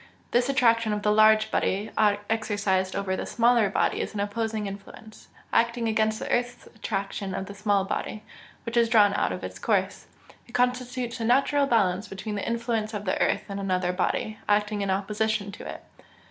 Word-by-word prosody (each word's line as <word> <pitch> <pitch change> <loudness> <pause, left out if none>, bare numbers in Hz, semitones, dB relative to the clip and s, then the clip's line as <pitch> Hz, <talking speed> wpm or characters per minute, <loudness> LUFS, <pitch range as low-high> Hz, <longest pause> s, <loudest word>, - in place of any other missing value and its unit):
This 245 +2 +2
attraction 230 -4 +3
of 210 -1 -3
the 210 - +3
large 215 0 +5
body 200 +3 0 0.4
exercised 205 -4 0
over 195 -1 -1
the - - -4
smaller 235 -3 +3
body - - 0
is - - -5
an - - -3
opposing 215 +1 -2
influence, 200 +2 -10 0.3
acting 235 0 +2
against 220 0 +1
the - - -5
earth's 245 0 -1
attraction 195 -2 -3
of 190 - -3
the 200 - -9
small 200 -1 +1
body, 215 +2 -4 0.4
which 230 - -4
is 235 -1 +4
drawn 210 -3 +5
out - - 0
of - - -5
its - - -7
course: - - -1 0.4
it 235 - -17
constitutes 250 0 -1
a - - -2
natural 275 +4 +3
balance 200 -4 +1
between 195 +3 -6
the 205 - -3
influence 230 -2 -2
of 205 0 -5
the 185 - -1
earth - - +1
and 200 0 -5
another 185 -2 0
body, 210 +3 -1
acting 210 0 +1
in 200 - -1
opposition 205 +1 -1
to 200 - -9
it. - - -8
215 Hz, 185 wpm, -26 LUFS, 200-230 Hz, 0.4 s, large